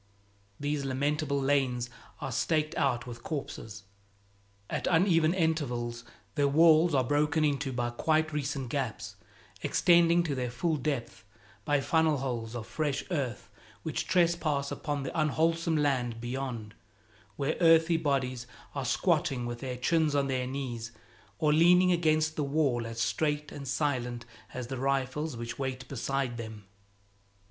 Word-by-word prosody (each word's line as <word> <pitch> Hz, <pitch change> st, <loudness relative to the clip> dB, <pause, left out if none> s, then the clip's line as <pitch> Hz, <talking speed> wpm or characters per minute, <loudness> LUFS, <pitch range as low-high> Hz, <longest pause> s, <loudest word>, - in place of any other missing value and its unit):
These 145 Hz, 0 st, -1 dB
lamentable 140 Hz, +2 st, 0 dB
lanes 135 Hz, -3 st, +1 dB, 0.3 s
are 135 Hz, -, -3 dB
staked 155 Hz, +5 st, 0 dB
out 125 Hz, -4 st, +1 dB
with 120 Hz, -1 st, -8 dB
corpses. 115 Hz, -9 st, -6 dB, 0.8 s
At -, -, -2 dB
uneven 165 Hz, -2 st, +4 dB
intervals 125 Hz, -9 st, -1 dB, 0.3 s
their 140 Hz, +4 st, +2 dB
walls 160 Hz, +2 st, +5 dB
are 130 Hz, -, +3 dB
broken 150 Hz, +4 st, +2 dB
into 140 Hz, -2 st, 0 dB
by 120 Hz, -1 st, -1 dB
quite 155 Hz, +5 st, +1 dB
recent 140 Hz, -3 st, -2 dB
gaps, 115 Hz, -6 st, -3 dB, 0.5 s
extending 170 Hz, -1 st, +4 dB
to 155 Hz, -4 st, -2 dB
their 125 Hz, -2 st, -2 dB
full 155 Hz, +7 st, -1 dB
depth, 135 Hz, -4 st, -3 dB, 0.4 s
by 145 Hz, -1 st, +2 dB
funnelholes 135 Hz, -8 st, 0 dB
of 115 Hz, -2 st, -5 dB
fresh 145 Hz, 0 st, -2 dB
earth 130 Hz, -, -3 dB, 0.3 s
which -, -, -3 dB
trespass 165 Hz, -5 st, +1 dB
upon 145 Hz, -2 st, -3 dB
the 135 Hz, -, -4 dB
unwholesome 165 Hz, +1 st, +1 dB
land 125 Hz, -6 st, 0 dB
beyond, 120 Hz, -3 st, -4 dB, 0.6 s
where 145 Hz, +2 st, -1 dB
earthy 165 Hz, 0 st, +5 dB
bodies 130 Hz, -5 st, -1 dB, 0.3 s
are -, -, -3 dB
squatting 125 Hz, -3 st, +1 dB
with 120 Hz, 0 st, -4 dB
their 125 Hz, -1 st, -4 dB
chins 155 Hz, +3 st, +2 dB
on 140 Hz, -1 st, +2 dB
their 130 Hz, -2 st, -1 dB
knees 125 Hz, -4 st, -4 dB, 0.5 s
or 150 Hz, +3 st, +2 dB
leaning 180 Hz, +3 st, +6 dB
against 155 Hz, -2 st, +2 dB
the 150 Hz, -, -1 dB
wall 140 Hz, -5 st, +1 dB
as 115 Hz, 0 st, -6 dB
straight 150 Hz, +5 st, 0 dB
and 140 Hz, -1 st, -7 dB
silent 125 Hz, -4 st, -1 dB, 0.3 s
as 125 Hz, -1 st, -5 dB
the 130 Hz, +1 st, -5 dB
rifles 135 Hz, +2 st, -1 dB
which 115 Hz, +2 st, -6 dB
wait 130 Hz, -2 st, -3 dB
beside 135 Hz, -1 st, -2 dB
them. 110 Hz, -3 st, -8 dB
140 Hz, 140 wpm, -30 LUFS, 125-155 Hz, 0.8 s, leaning